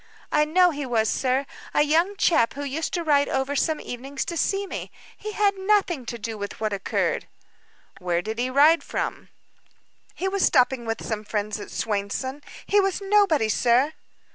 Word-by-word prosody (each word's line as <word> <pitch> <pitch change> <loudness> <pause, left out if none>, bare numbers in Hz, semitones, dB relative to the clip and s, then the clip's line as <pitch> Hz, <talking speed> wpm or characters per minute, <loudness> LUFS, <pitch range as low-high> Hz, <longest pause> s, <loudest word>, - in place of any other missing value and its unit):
"I 300 0 +3
know 355 +3 +4
he 290 -1 -4
was, 225 -4 +1
sir. 265 +1 0 0.3
A 295 - +5
young 335 +7 +2
chap 245 -13 +3
who 285 - -4
used 285 +3 -3
to 345 - -1
ride 285 -3 +3
over 265 +2 -1
some 315 +2 +1
evenings 265 +3 -5
to 340 - -4
see 390 +4 0
me. - - -6 0.3
He 425 0 -7
had 405 -1 +2
nothing 380 - +1
to 235 - -4
do 225 -1 -6
with 200 0 -6
what 215 -1 -1
occurred." 195 -1 -1 0.7
"Where 175 -2 -1
did 220 +2 -4
he 250 +1 0
ride 295 +5 +5
from?" - - -4 0.9
"He 380 - -2
was 390 0 0
stopping 255 -3 +3
with 225 - -3
some 215 -2 -3
friends 210 0 -3
at - - -8
Swainson. 225 +7 -3 0.2
He 410 - +3
was 390 -1 +1
nobody, 395 - +3
sir." 245 +7 +2
280 Hz, 180 wpm, -24 LUFS, 230-340 Hz, 0.9 s, A